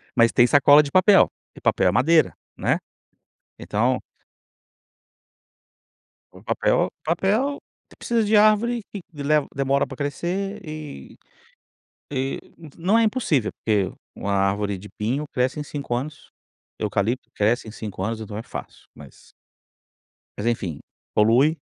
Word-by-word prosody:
Mas 115 Hz, -1 st, +5 dB
tem 120 Hz, -, +5 dB
sacola 145 Hz, +2 st, +6 dB
de 140 Hz, -, -6 dB
papel, 190 Hz, +1 st, +6 dB, 0.3 s
e -, -, -13 dB
papel -, -, +2 dB
é -, -, +2 dB
madeira, 160 Hz, +5 st, +3 dB, 0.2 s
né, -, -, +1 dB, 0.8 s
então -, -, 0 dB, 2.3 s
O -, -, -16 dB
papel -, -, +1 dB
papel, 210 Hz, -, +1 dB, 0.4 s
precisa 235 Hz, -2 st, 0 dB
de 210 Hz, +1 st, +2 dB
árvore 215 Hz, +3 st, +4 dB
que 200 Hz, -, -6 dB
leva 150 Hz, 0 st, +1 dB
demora 140 Hz, 0 st, +1 dB
para 135 Hz, -, -9 dB
crescer 185 Hz, +8 st, -3 dB
e 155 Hz, -, -8 dB, 1.0 s
e 135 Hz, 0 st, -2 dB, 0.4 s
não 190 Hz, +7 st, +2 dB
é 230 Hz, -, +4 dB
impossível, 210 Hz, -, 0 dB
porque 105 Hz, -4 st, 0 dB, 0.2 s
uma 100 Hz, -, -3 dB
árvore 100 Hz, +1 st, 0 dB
de 105 Hz, +3 st, -11 dB
pinho 125 Hz, +8 st, -1 dB
cresce 130 Hz, +3 st, 0 dB
em -, -, -2 dB
5 140 Hz, -4 st, -4 dB
anos, 140 Hz, +5 st, -5 dB, 0.5 s
eucalipto 110 Hz, +4 st, -1 dB
cresce 110 Hz, +2 st, +1 dB
em -, -, -6 dB
5 105 Hz, -4 st, -6 dB
anos, 110 Hz, +2 st, -2 dB
então 105 Hz, -1 st, -7 dB
é 110 Hz, -, -4 dB
fácil, 130 Hz, -, -9 dB
mas -, -, -16 dB, 1.1 s
mas 105 Hz, -, -4 dB
enfim, 95 Hz, -10 st, -2 dB, 0.3 s
polui 125 Hz, +9 st, +4 dB
140 Hz, 135 wpm, -23 LUFS, 110-175 Hz, 2.3 s, sacola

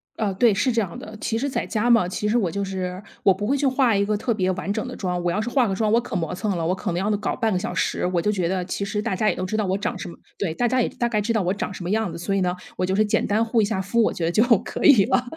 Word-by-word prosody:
呃， 210 Hz, -3 st, -1 dB
对， 225 Hz, +4 st, +4 dB
是 210 Hz, +6 st, +1 dB
这 230 Hz, -1 st, +1 dB
样 175 Hz, -4 st, -5 dB
的。 215 Hz, +1 st, -9 dB
其 225 Hz, -, -1 dB
实 275 Hz, -, -1 dB
在 270 Hz, -, -2 dB
家 235 Hz, +2 st, +1 dB
嘛， 230 Hz, -6 st, +4 dB
其 200 Hz, +3 st, -3 dB
实 225 Hz, +3 st, +2 dB
我 185 Hz, -6 st, 0 dB
就 200 Hz, +4 st, -3 dB
是 185 Hz, -1 st, -4 dB, 0.2 s
我 195 Hz, -, +5 dB
不 200 Hz, +2 st, -2 dB
会 270 Hz, +6 st, +1 dB
去 280 Hz, 0 st, +1 dB
画 255 Hz, -4 st, +3 dB
一 200 Hz, -, +2 dB
个 210 Hz, 0 st, 0 dB
特 230 Hz, +2 st, -1 dB
别 185 Hz, -3 st, 0 dB
完 185 Hz, +1 st, -3 dB
整 220 Hz, +3 st, -3 dB
的 255 Hz, -, -6 dB
妆。 180 Hz, -2 st, -2 dB
我 175 Hz, -, +1 dB
要 205 Hz, -, -1 dB
是 220 Hz, -, -2 dB
化 245 Hz, -1 st, +2 dB
个 195 Hz, -, -1 dB
妆 215 Hz, +1 st, +1 dB
我 230 Hz, +2 st, +4 dB
可 240 Hz, -2 st, -6 dB
磨 165 Hz, -4 st, -2 dB
蹭 200 Hz, 0 st, -2 dB
了， 165 Hz, -, -2 dB
我 180 Hz, -, +1 dB
可 185 Hz, -, -3 dB
能 175 Hz, -, -1 dB
要 210 Hz, +3 st, 0 dB
搞 210 Hz, -, -2 dB
半 225 Hz, -3 st, 0 dB
个 180 Hz, -, +1 dB
小 225 Hz, +5 st, -4 dB
时， -, -, -1 dB
我 180 Hz, -1 st, 0 dB
就 210 Hz, +5 st, +1 dB
觉 185 Hz, -4 st, -1 dB
得 185 Hz, 0 st, -1 dB
其 200 Hz, -, -3 dB
实 210 Hz, +1 st, -2 dB
大 200 Hz, -, -1 dB
家 215 Hz, +3 st, +2 dB
也 -, -, 0 dB
都 185 Hz, -, -3 dB
知 215 Hz, +3 st, -3 dB
道 215 Hz, -, +1 dB
我 190 Hz, -, 0 dB
长 215 Hz, +4 st, -2 dB
什 -, -, -6 dB
么 -, -, -11 dB, 0.2 s
对， 185 Hz, -6 st, -1 dB
大 245 Hz, -, +1 dB
家 255 Hz, +1 st, +2 dB
也 -, -, 0 dB
大 240 Hz, -, -2 dB
概 215 Hz, -3 st, 0 dB
知 230 Hz, +3 st, -1 dB
道 220 Hz, -4 st, +1 dB
我 180 Hz, -, +1 dB
长 205 Hz, -, -4 dB
什 185 Hz, -, -7 dB
么 175 Hz, -, -4 dB
样 215 Hz, -4 st, 0 dB
子， -, -, -7 dB
所 185 Hz, +4 st, -2 dB
以 195 Hz, -, +1 dB
呢， 180 Hz, 0 st, 0 dB, 0.2 s
我 185 Hz, -, +1 dB
就 190 Hz, +1 st, 0 dB
是 215 Hz, +1 st, +3 dB
简 205 Hz, -, +1 dB
单 215 Hz, +3 st, +2 dB
护 225 Hz, 0 st, +2 dB
一 -, -, +3 dB
下 200 Hz, -2 st, -2 dB
肤， 200 Hz, +5 st, +1 dB
我 220 Hz, -, +3 dB
觉 165 Hz, -, -3 dB
得 170 Hz, -, +1 dB
就 220 Hz, +5 st, +4 dB, 0.2 s
可 -, -, -5 dB
以 240 Hz, -10 st, +7 dB
了。 250 Hz, -, +2 dB
205 Hz, 385 characters per minute, -23 LUFS, 185-225 Hz, 0.2 s, 以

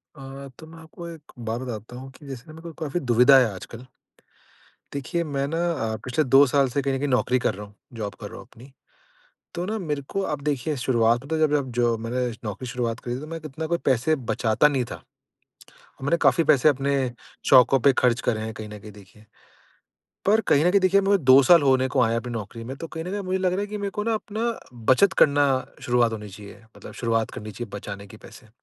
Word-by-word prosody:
अ, 135 Hz, 0 st, -9 dB
तो 160 Hz, -, -11 dB
मैं 165 Hz, +1 st, -13 dB
आपको 165 Hz, +2 st, -10 dB
एक 160 Hz, -2 st, -13 dB, 0.2 s
बात 115 Hz, +3 st, -2 dB
बताता 120 Hz, -1 st, -7 dB
हूँ 135 Hz, +1 st, -9 dB
कि 145 Hz, +2 st, -16 dB
जैसे 130 Hz, -3 st, -7 dB
ना 155 Hz, -, -11 dB
मेरे 160 Hz, -, -12 dB
को 170 Hz, -1 st, -9 dB
काफ़ी 155 Hz, +3 st, -2 dB
दुविधा 125 Hz, 0 st, +5 dB
है 125 Hz, -, +4 dB
आजकल। 115 Hz, +6 st, -10 dB, 1.1 s
देखिए 155 Hz, +5 st, -2 dB
मैं 140 Hz, -3 st, -2 dB
ना 165 Hz, +3 st, -3 dB, 0.2 s
अ, 115 Hz, -7 st, -2 dB
पिछले 125 Hz, +5 st, +1 dB
2 135 Hz, +1 st, +6 dB
साल 140 Hz, +1 st, +3 dB
से 140 Hz, +3 st, -1 dB
कहीं 135 Hz, 0 st, -1 dB
न -, -, -1 dB
कहीं 145 Hz, -, -1 dB
नौकरी 130 Hz, -1 st, +1 dB
कर -, -, 0 dB
रहा 105 Hz, +1 st, -8 dB
हूँ, 100 Hz, 0 st, -19 dB, 0.2 s
जॉब 105 Hz, -3 st, -5 dB
कर -, -, -5 dB
रहा -, -, -10 dB
हूँ -, -, -12 dB
अपनी। 125 Hz, +4 st, -16 dB, 0.8 s
तो 175 Hz, +1 st, -3 dB
ना 215 Hz, +3 st, -2 dB
मेरे 150 Hz, -6 st, -3 dB
को 195 Hz, -, -2 dB
आप 150 Hz, -6 st, -3 dB
देखिए 145 Hz, 0 st, -1 dB
शुरुआत 120 Hz, -1 st, +2 dB
में 160 Hz, -, +1 dB
जब 155 Hz, -2 st, +3 dB
जब 140 Hz, -3 st, 0 dB
जो 120 Hz, -1 st, +2 dB
मैंने 120 Hz, +3 st, -2 dB, 0.2 s
नौकरी 105 Hz, +3 st, -5 dB
शुरुआत 120 Hz, -1 st, -3 dB
करी 120 Hz, 0 st, -4 dB
थी -, -, -5 dB
तो 150 Hz, -, -8 dB
मैं 165 Hz, +1 st, -5 dB
इतना 155 Hz, +2 st, -5 dB
कोई 170 Hz, +1 st, 0 dB
पैसे 135 Hz, +4 st, +2 dB, 0.2 s
बचाता 110 Hz, +5 st, +3 dB
नहीं 135 Hz, -4 st, 0 dB
था, -, -, -7 dB, 1.0 s
मैंने 145 Hz, +5 st, +2 dB
काफ़ी 135 Hz, +3 st, +4 dB
पैसे 150 Hz, -1 st, +5 dB
अपने 140 Hz, 0 st, +1 dB, 0.6 s
शौकों 130 Hz, +2 st, +7 dB
पे 140 Hz, +3 st, +5 dB
खर्च 125 Hz, -2 st, +3 dB
करे 110 Hz, -3 st, +1 dB
हैं 110 Hz, 0 st, -4 dB
कहीं 110 Hz, -1 st, -8 dB
न 105 Hz, 0 st, -9 dB
कहीं 105 Hz, +1 st, -11 dB
देखिए, 105 Hz, +1 st, -17 dB, 1.0 s
पर 215 Hz, +3 st, +4 dB
कहीं 150 Hz, -8 st, +2 dB
न 175 Hz, -, +4 dB
कहीं 200 Hz, +1 st, +4 dB
देखिए 190 Hz, +1 st, +4 dB
मेरे 200 Hz, 0 st, +3 dB
2 135 Hz, -3 st, +6 dB
साल 170 Hz, +4 st, +6 dB
होने 130 Hz, -1 st, +3 dB
को 130 Hz, 0 st, 0 dB
आएँ 115 Hz, -, +2 dB
हैं 115 Hz, -, 0 dB
अपनी 125 Hz, 0 st, -7 dB
नौकरी 115 Hz, +1 st, -6 dB
में 130 Hz, +3 st, -6 dB
तो 165 Hz, -, -7 dB
कहीं 160 Hz, 0 st, -7 dB
न -, -, -6 dB
कहीं 205 Hz, -, -3 dB
अब 200 Hz, -, -5 dB
मुझे 185 Hz, +1 st, -1 dB
लग 185 Hz, -1 st, +1 dB
रहा 185 Hz, -, -1 dB
है 205 Hz, -, -2 dB
कि 210 Hz, +1 st, -6 dB
मेरे 200 Hz, -1 st, -3 dB
को 210 Hz, -, -4 dB
ना 230 Hz, 0 st, +1 dB
अपना 220 Hz, +2 st, -2 dB, 0.4 s
बचत 195 Hz, +9 st, +4 dB
करना 145 Hz, 0 st, +4 dB, 0.4 s
शुरुआत 120 Hz, -2 st, +2 dB
होनी 105 Hz, -1 st, -6 dB
चाहिए, 100 Hz, +2 st, -12 dB
मतलब -, -, -11 dB
शुरुआत 115 Hz, -2 st, -1 dB
करनी 110 Hz, 0 st, -8 dB
चाहिए 120 Hz, +4 st, -7 dB
बचाने 100 Hz, 0 st, -8 dB
की 105 Hz, -, -13 dB
पैसे। 110 Hz, +2 st, -15 dB
135 Hz, 240 wpm, -24 LUFS, 120-160 Hz, 1.1 s, शौकों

